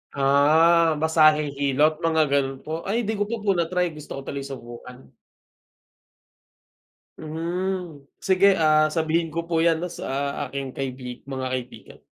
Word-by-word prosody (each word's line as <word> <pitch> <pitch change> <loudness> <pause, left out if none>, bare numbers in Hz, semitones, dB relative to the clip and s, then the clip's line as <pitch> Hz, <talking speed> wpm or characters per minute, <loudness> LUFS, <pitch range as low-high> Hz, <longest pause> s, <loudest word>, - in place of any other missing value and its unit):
Ah, 155 +4 +4
masahe, 155 -2 +4
hilot, 145 +3 +2
mga 160 -1 +1
gano'n 135 -1 0
po. 160 +1 -4
Ay 230 +4 0
hindi 220 - -2
ko 205 - 0
pa 235 - -2
po 200 - +2
natry, 180 0 0
gusto 150 -1 -9
ko 135 - -6
tuloy 140 0 -5
subukan. 125 0 -11 2.1
Mhm. 170 0 -4 0.2
Sige, 190 +1 +3
ah, 155 0 +3
sabihin 165 0 0
ko 165 - -2
po 165 - 0
'yan, 165 0 +2
'no, 180 - -3
sa - - -8 0.4
aking 140 0 -5
kaibi 130 -2 -6
mga 135 -1 -5
kaibigan. 125 -3 -7
155 Hz, 145 wpm, -24 LUFS, 140-170 Hz, 2.1 s, Ah